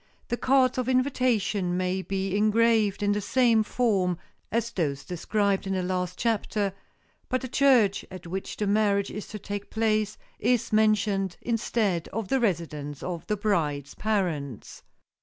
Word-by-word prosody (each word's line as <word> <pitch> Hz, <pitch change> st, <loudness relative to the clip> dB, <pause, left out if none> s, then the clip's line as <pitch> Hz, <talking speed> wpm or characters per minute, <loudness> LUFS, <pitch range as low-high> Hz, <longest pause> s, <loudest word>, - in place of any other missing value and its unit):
The 240 Hz, -, +1 dB
cards 260 Hz, 0 st, +3 dB
of 250 Hz, 0 st, -1 dB
invitation 245 Hz, -8 st, +1 dB
may 185 Hz, +1 st, 0 dB
be 195 Hz, 0 st, -2 dB
engraved 215 Hz, -1 st, +3 dB
in 205 Hz, -, +2 dB
the 205 Hz, 0 st, 0 dB
same 230 Hz, +2 st, +3 dB
form 200 Hz, -6 st, +1 dB, 0.3 s
as 230 Hz, +1 st, 0 dB
those 145 Hz, -9 st, -2 dB
described 200 Hz, +2 st, 0 dB
in 195 Hz, -, -1 dB
the 185 Hz, -1 st, -1 dB
last 180 Hz, 0 st, -2 dB
chapter, 210 Hz, -3 st, 0 dB, 0.6 s
but 255 Hz, -1 st, 0 dB
the 260 Hz, -, -4 dB
church 250 Hz, -6 st, +4 dB
at 185 Hz, -2 st, -10 dB
which 190 Hz, +3 st, -5 dB
the 210 Hz, -, -1 dB
marriage 200 Hz, -1 st, +2 dB
is 210 Hz, -, -6 dB
to 210 Hz, -, -6 dB
take 205 Hz, 0 st, -6 dB
place 215 Hz, -2 st, 0 dB, 0.2 s
is 235 Hz, 0 st, +1 dB
mentioned 210 Hz, -3 st, +2 dB
instead 220 Hz, -6 st, 0 dB
of 220 Hz, -2 st, -4 dB
the 270 Hz, -, +2 dB
residence 155 Hz, -, -2 dB
of 175 Hz, -2 st, -5 dB
the 210 Hz, -, 0 dB
bride's 150 Hz, -9 st, -1 dB
parents. 170 Hz, -, -2 dB
205 Hz, 155 wpm, -27 LUFS, 185-225 Hz, 0.6 s, church